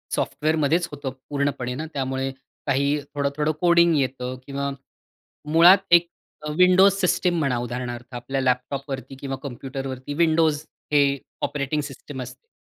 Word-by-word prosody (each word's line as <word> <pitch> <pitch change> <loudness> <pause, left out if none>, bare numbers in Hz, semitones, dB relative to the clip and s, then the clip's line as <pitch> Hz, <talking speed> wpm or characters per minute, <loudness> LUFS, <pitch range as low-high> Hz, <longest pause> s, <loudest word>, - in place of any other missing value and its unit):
सॉफ्टवेअरमध्येच 155 +2 +1
होतो 145 -2 -5 0.2
पूर्णपणे 140 -3 -1
ना, 155 +4 -4
त्यामुळे 135 -1 -2 0.4
काही 140 +2 +2 0.2
थोडं-थोडं 145 +2 0
कोडिंग 170 -1 +5
येतं 130 -2 -2
किंवा 140 0 -3 0.8
मुळात 170 +4 +8
एक 170 0 +6 0.3
अ, 150 - -4
विंडोज 185 +2 +6
सिस्टम 180 -1 +2
म्हणा 135 -5 +1
उदाहरणार्थ. 120 0 -5
आपल्या 135 +3 -3
लॅपटॉपवरती 130 +1 -2
किंवा 135 -1 -4
कॉम्प्युटरवरती 135 0 -5
विंडोज 160 -1 +2 0.3
हे 140 -1 +4 0.3
ऑपरेटिंग 150 +1 -1
सिस्टम 140 -1 -8
असते. 130 - -10
140 Hz, 125 wpm, -24 LUFS, 130-155 Hz, 0.8 s, मुळात